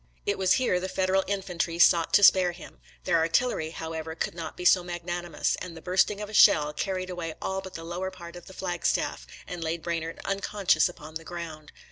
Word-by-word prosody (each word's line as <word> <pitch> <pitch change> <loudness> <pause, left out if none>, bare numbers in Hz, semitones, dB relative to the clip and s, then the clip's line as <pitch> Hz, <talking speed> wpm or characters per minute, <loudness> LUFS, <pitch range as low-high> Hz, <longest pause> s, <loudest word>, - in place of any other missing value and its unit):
It 200 - -1
was 185 -1 +4
here 245 -9 +2
the 185 +1 -4
Federal 190 +1 +1
infantry 180 -4 -2
sought 170 -1 +5
to 205 - +5
spare 185 -2 +6
him; 175 - -13 0.2
their 170 -2 +2
artillery, 165 +1 +1
however, 160 0 -6
could - - -3
not 165 -2 -7
be 180 - -6
so 180 0 +6
mag 175 -1 -6
nanimous, 175 -2 -1
and 170 -2 -7
the - - -10
bursting 185 +3 +2
of 210 - -4
a 215 - -11
shell 150 -6 +6
carried 185 +3 -3
away 165 -3 -5
all 190 0 -3
but 190 -1 -10
the 165 - -6
lower 175 +3 -4
part 175 -2 -11
of 175 - -11
the 190 - -11
flagstaff, 175 -2 -2 0.2
and 175 -2 -6
laid 160 +1 -3
Branard 165 -1 -3
unconscious 195 -1 +1
upon 155 -3 -11
the 165 +1 -6
ground. 160 -3 -8
175 Hz, 210 wpm, -27 LUFS, 165-185 Hz, 0.2 s, spare